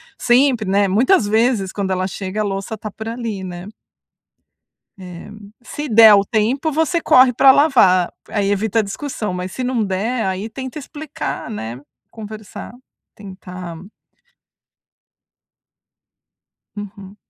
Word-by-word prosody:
sempre 240 -4 +2
né, 200 0 +3
muitas 230 - +3
vezes 220 -2 +1
quando 200 -2 -3
ela 185 0 -1
chega 195 +2 -4
a - - +1
louça 195 +1 -4
está 215 0 -8
por 220 +2 -8
ali, 230 -5 -5
né? 180 0 -7 1.3
Eh, 180 -2 -10 0.3
se 295 +4 -6
der 220 -2 +8
o 200 - +2
tempo 250 +9 0
você 320 +3 +1
corre 255 -4 +5
pra 265 +3 +6
lavar, 230 - +4 0.2
aí 200 -2 -1
evita 210 +2 +1
a - - +1
discussão, 210 -1 -5
mas 180 0 -5
se 255 - -5
não 250 -3 0
der, 215 +5 -2
aí 190 +3 -3
tenta 260 +3 -7
explicar, 300 -1 -6
né? 120 - -6 0.3
Conversar, 215 0 -9 0.4
tentar 185 -3 -9 3.0
Uhum. 200 -1 -9
215 Hz, 130 wpm, -19 LUFS, 190-250 Hz, 3.0 s, der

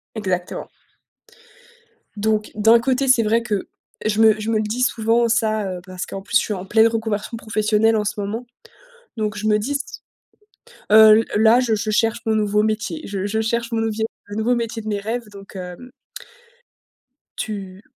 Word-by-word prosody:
Exactement 185 -4 -3 1.5
donc, 215 0 0
d'un 225 +2 +5
côté, 265 +2 0
c'est 255 -2 +5
vrai 225 +2 +2
que 210 -5 -3 0.4
je 215 0 +1
me 220 -1 +5
je 215 +1 -3
me 225 - +1
le - - 0
dis 220 +4 -2
souvent 230 -1 +2
ça, 220 -2 +1
heu, 180 -1 -5
parce 185 -1 -5
qu'en 195 - -6
plus 230 +4 -3
je - - +6
suis - - -3
en 185 0 -7
pleine 220 +3 +4
reconversion 225 -1 -3
professionnelle 220 0 +1
en 210 - 0
ce 210 0 -3
moment. 220 +5 -4 0.7
Donc 210 -1 -2
je 215 +1 -2
me 210 0 +3
dis 230 +7 -3
s 285 0 -5 0.9
heu, 215 0 +8
l 225 - -1 0.2
là, 225 +2 +6
je 240 -3 +1
je 215 +1 -3
cherche 225 +2 +1
mon 220 -1 +1
nouveau 210 -1 +2
métier, 220 +8 -2
je 195 -1 -3
je 220 +2 -1
cherche 235 +1 -2
mon 230 - 0
levier, 220 0 -1 0.2
un 205 - -6
nouveau 220 +3 +1
métier 230 -1 -3
de 215 - -10
mes 205 -1 -1
rêves. 225 +3 -4
Donc, 200 0 -13
heu, 180 -1 -6
mmh 250 - -12 1.5
tu 195 -3 -6
220 Hz, 190 wpm, -21 LUFS, 210-230 Hz, 1.5 s, heu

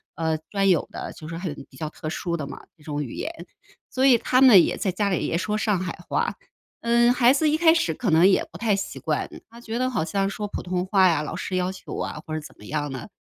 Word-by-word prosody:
呃， 160 0 0
专 195 -1 +2
有 175 -4 +2
的， - - -6
就 155 - -10
是 165 +1 -6
很 175 -5 -4 0.2
比 130 - -15
较 155 +2 -4
特 155 - -8
殊 170 +1 -3
的 150 - -4
嘛， 140 - -9 0.2
这 150 - -21
种 150 -1 -3
语 125 - -7
言。 - - -4 0.6
所 260 +1 +1
以 260 -3 +7
他 255 +3 +2
们 225 -10 +9
也 - - -1
在 190 - -1
家 200 +3 0
里 180 - 0
也 165 - 0
说 210 +3 -1
上 210 -3 +1
海 185 -2 -4
话， - - 0 0.5
嗯， 235 +1 +4
孩 245 0 +5
子 305 +2 +2
一 305 - +2
开 325 0 +6
始 330 0 +1
可 215 -7 -1
能 165 +3 +6
也 195 - +3
不 - - -10
太 220 -3 +2
习 195 0 -5
惯， - - -1 0.2
他 230 +1 -14
觉 235 0 -4
得 255 0 +1
好 215 -10 -1
像 195 +2 0
说 210 +1 -4
普 - - -4
通 180 0 -2
话 190 -1 +4
呀， 160 -3 +1
老 - - -5
师 185 - -4
要 180 0 0
求 190 - -8
啊， 150 - -4
或 155 - -3
者 155 - -3
怎 150 - -12
么 105 - -13
样 145 +2 -3
的， 130 -3 -7
190 Hz, 290 characters per minute, -24 LUFS, 160-235 Hz, 0.6 s, 们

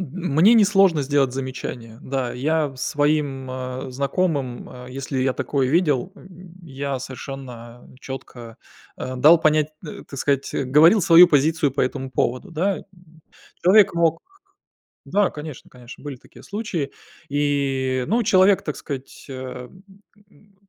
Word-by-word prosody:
М 185 - -4 0.3
мне 195 +9 +6
не 220 -3 +6
сложно 195 -6 +3
сделать 135 -2 +1
замечание, 125 -3 -6
да. 130 -2 -3
Я 150 +2 -1
своим, 145 -1 -1
а, 130 +1 -6
знакомым, 140 -1 -2
а, 125 0 -11
если 135 +1 -5
я 130 0 +1
такое 135 -3 -1
видел, 155 0 +1
м, 185 -2 -15
я 140 -3 -4
совершенно 125 -2 -9
чётко, 120 -3 -9 0.4
а, 130 0 -5
дал 155 +7 +6
понять, 155 -1 +2 0.2
э, - - -8
так 140 - -8
сказать, 140 0 -1
э, 140 - -1
говорил 155 +10 +5
свою 175 0 +8
позицию 150 -1 +2
по 140 - -2
этому 130 +1 -3
поводу, 130 - -2
да, 185 +5 -1
м. - - -12 0.8
Человек 195 +1 +5
мог 165 -1 +1 0.9
да, 205 -1 +1
конечно 150 -2 -9
конечно, 125 0 -13
были 145 -3 -7
такие - - -18
случаи. 195 -9 -4 0.4
И 140 -2 0
и, 130 - -1
ну, 235 +3 +2
человек, 195 -2 +4
так 150 - -5
сказать, 135 -2 -8
а, 130 -1 -7 0.6
м, 205 -1 -25
140 Hz, 150 wpm, -22 LUFS, 130-165 Hz, 0.9 s, свою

